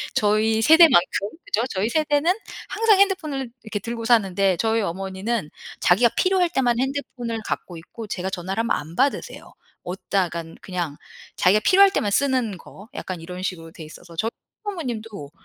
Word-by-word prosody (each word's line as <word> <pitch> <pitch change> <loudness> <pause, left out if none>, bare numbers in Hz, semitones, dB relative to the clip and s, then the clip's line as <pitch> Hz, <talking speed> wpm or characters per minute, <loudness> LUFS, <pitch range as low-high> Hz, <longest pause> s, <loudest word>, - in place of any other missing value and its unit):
저희 220 +1 +2
세대만큼. 225 - +5 0.2
그죠? 225 +4 0
저희 200 +4 -1
세대는 305 +4 +2 0.4
항상 435 -3 +3
핸드폰을 310 -10 +1
이렇게 220 -2 -4
들고 230 +1 -5
사는데 195 -5 +3
저희 225 0 +1
어머니는 190 +1 -3 0.3
자기가 230 +7 +4
필요할 370 -2 +3
때만 245 -7 +1
핸드폰을 255 -4 -3
갖고 175 - -4
있고 215 +7 -10
제가 190 -2 -3
전화를 190 +3 -3
하면 230 - -3
안 160 +3 -8
받으세요. 275 +2 -1 0.3
어디다간 175 -3 -3
그냥 175 -6 -4 0.4
자기가 200 +4 +4
필요할 390 - +6
때만 205 - 0
쓰는 255 -5 +1
거. 200 +5 -14
약간 185 -3 -5
이런 180 +2 -7
식으로 165 -3 -4
돼 165 - -10
있어서 165 +2 -13
저희 225 - 0 0.3
시부모님도 225 - -5
220 Hz, 375 characters per minute, -23 LUFS, 185-265 Hz, 0.4 s, 필요할